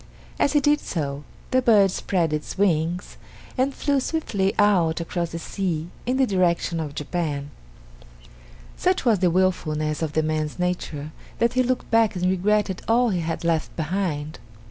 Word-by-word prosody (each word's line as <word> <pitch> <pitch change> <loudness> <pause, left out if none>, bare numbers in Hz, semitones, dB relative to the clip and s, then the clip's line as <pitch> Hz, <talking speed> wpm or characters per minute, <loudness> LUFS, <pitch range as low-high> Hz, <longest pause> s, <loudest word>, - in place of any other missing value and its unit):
As 280 - +2
he 295 - +5
did 295 +1 +3
so, 145 -4 -4 0.3
the 255 - +3
bird 210 -6 +5
spread 175 -4 0
its 150 +4 -4
wings 175 -2 0 0.4
and 265 +2 +1
flew 280 0 0
swiftly 220 -10 -1
out 180 -6 +3
across 170 0 -2
the 165 - -5
sea 170 -1 -3 0.2
in 255 +1 +1
the 265 - +4
direction 175 -5 +1
of 150 -2 -5
Japan. 150 -2 -3 1.2
Such 365 -5 0
was 225 -5 +4
the 180 -1 +3
wilfulness 155 -4 0
of 155 -2 -2
the 155 - +2
man's 155 -1 -2
nature 175 -4 -3 0.3
that 235 +1 +2
he 255 - +3
looked 255 0 -1
back 225 -2 +3
and 180 0 -1
regretted 190 +1 +1
all 235 +2 +3
he 185 -4 0
had 165 0 -3
left 165 -2 0
behind. 160 -3 -2
180 Hz, 165 wpm, -24 LUFS, 160-210 Hz, 1.2 s, he